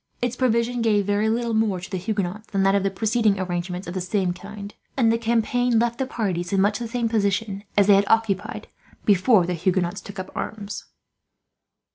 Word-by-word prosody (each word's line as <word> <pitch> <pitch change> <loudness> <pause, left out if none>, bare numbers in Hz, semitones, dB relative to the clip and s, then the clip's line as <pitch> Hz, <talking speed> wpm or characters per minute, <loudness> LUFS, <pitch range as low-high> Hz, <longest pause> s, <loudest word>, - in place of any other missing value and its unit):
Its 245 0 -1
provisions 240 -1 +1
gave 210 -3 +2
very 205 +2 +1
little 230 +1 0
more 220 -4 +1
to 180 - -10
the 190 - -1
Huguenots 210 +1 -3
than 195 -2 0
that 195 0 +4
of 200 - +3
the 195 - +1
preceding 215 0 +1
arrangement 180 0 -3
of 175 - -6
the 185 - -3
same 185 -1 0
kind, 200 +2 -9 0.2
and 230 -4 +4
the - - +2
campaign 235 +1 +1
left 235 +2 +1
the 265 - -1
parties 185 -9 -2
in 195 - +2
much 205 +3 +2
the 235 - -4
same 235 0 -1
position 205 -2 0
as 200 - +6
they 205 - +6
had 200 +1 +4
occupied 225 0 0 0.4
before 200 -1 +4
the 180 - -2
Huguenots 175 +1 0
took 200 - -10
up 185 0 -6
arms. 205 -1 -5
205 Hz, 200 wpm, -23 LUFS, 190-225 Hz, 0.4 s, as